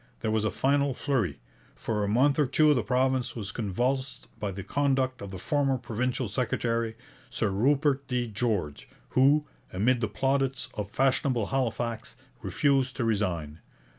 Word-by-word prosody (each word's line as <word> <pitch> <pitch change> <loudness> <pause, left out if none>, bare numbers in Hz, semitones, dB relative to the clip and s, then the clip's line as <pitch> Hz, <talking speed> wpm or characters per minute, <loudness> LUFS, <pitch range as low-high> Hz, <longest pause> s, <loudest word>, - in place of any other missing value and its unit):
There 110 - 0
was 110 -1 +1
a 110 - +2
final 140 +1 +1
flurry. 120 - -1 0.4
For 105 -2 -2
a - - 0
month 135 +8 +3
or 145 - +3
two 150 +3 +4
the 125 - +1
province 130 -1 +1
was 105 -3 -4
convulsed 125 +6 -2
by 105 - -2
the 95 +1 -6
conduct 135 -1 0
of 100 - -6
the 95 - -7
former 135 +5 +1
provincial 125 +1 -2
secretary, 115 0 -1 0.3
Sir 110 -3 -1
Rupert 135 +6 +2
D. 125 -1 -1
George, 105 -9 -2 0.2
who, 145 +3 +4 0.3
amid 120 +6 +2
the 110 - +1
plaudits 135 +4 0
of 105 -2 -4
fashionable 130 -2 +1
Halifax, 115 -3 -2 0.3
refused 135 -3 +1
to 125 - -1
resign. 90 -9 -1
125 Hz, 155 wpm, -28 LUFS, 105-135 Hz, 0.4 s, two